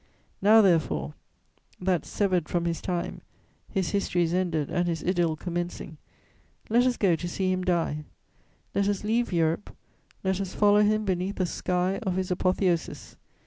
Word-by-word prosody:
Now, 215 Hz, +3 st, +7 dB
therefore, 80 Hz, -, +1 dB, 0.7 s
that, 180 Hz, -3 st, 0 dB
severed 185 Hz, -5 st, 0 dB
from 170 Hz, -1 st, 0 dB
his 170 Hz, -1 st, -2 dB
time, 175 Hz, -2 st, -3 dB, 0.5 s
his 190 Hz, -4 st, -1 dB
history 195 Hz, -3 st, +1 dB
is 165 Hz, 0 st, -1 dB
ended 170 Hz, -5 st, 0 dB
and 175 Hz, 0 st, 0 dB
his 165 Hz, -2 st, -2 dB
idyll 175 Hz, -3 st, +1 dB
commencing, 175 Hz, -1 st, -5 dB, 0.7 s
let 240 Hz, +3 st, +4 dB
us 250 Hz, -, 0 dB
go 185 Hz, -5 st, +3 dB
to 175 Hz, +2 st, -5 dB
see 185 Hz, +1 st, -1 dB
him 185 Hz, 0 st, -1 dB
die: 165 Hz, -4 st, 0 dB, 0.7 s
let 200 Hz, 0 st, +1 dB
us 205 Hz, -1 st, -1 dB
leave 230 Hz, +2 st, 0 dB
Europe; 165 Hz, +2 st, 0 dB, 0.5 s
let 190 Hz, 0 st, 0 dB
us 190 Hz, -1 st, -5 dB
follow 205 Hz, 0 st, +5 dB
him 215 Hz, +1 st, +2 dB
beneath 190 Hz, +1 st, -1 dB
the 185 Hz, -, 0 dB
sky 180 Hz, +2 st, -1 dB
of 190 Hz, -5 st, -1 dB
his 185 Hz, 0 st, -2 dB
apotheosis! 185 Hz, -1 st, 0 dB
180 Hz, 160 wpm, -27 LUFS, 170-195 Hz, 0.7 s, Now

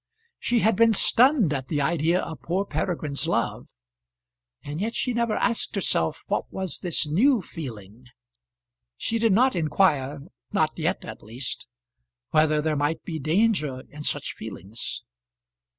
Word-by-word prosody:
She 240 Hz, -2 st, +1 dB
had 220 Hz, -1 st, +3 dB
been 230 Hz, +2 st, +5 dB
stunned 240 Hz, -, +4 dB
at 135 Hz, -2 st, -3 dB
the 150 Hz, -, -1 dB
idea 165 Hz, +4 st, +2 dB
of 160 Hz, -, -7 dB
poor 185 Hz, +4 st, -1 dB
Peregrine's 155 Hz, -8 st, -2 dB
love, -, -, -1 dB, 1.0 s
and 150 Hz, +4 st, -5 dB
yet 225 Hz, +3 st, -2 dB
she 250 Hz, -, 0 dB
never 235 Hz, -2 st, +1 dB
asked 230 Hz, -1 st, 0 dB
herself 85 Hz, -, 0 dB
what -, -, -2 dB
was 190 Hz, -3 st, -4 dB
this 170 Hz, -2 st, 0 dB
new 225 Hz, -, +3 dB
feeling. 120 Hz, -, -9 dB, 0.9 s
She 230 Hz, -, -1 dB
did 225 Hz, -1 st, +3 dB
not 250 Hz, +5 st, +4 dB
inquire 150 Hz, -4 st, +1 dB, 0.3 s
not -, -, +2 dB
yet -, -, -1 dB
at -, -, -8 dB
least 120 Hz, +4 st, -4 dB, 0.6 s
whether 155 Hz, -1 st, +3 dB
there 155 Hz, -1 st, +1 dB
might 150 Hz, +2 st, -1 dB
be 160 Hz, -2 st, -4 dB
danger 155 Hz, -, +1 dB
in 150 Hz, -, -9 dB
such -, -, -1 dB
feelings. 100 Hz, +6 st, -7 dB
160 Hz, 145 wpm, -25 LUFS, 145-215 Hz, 1.0 s, been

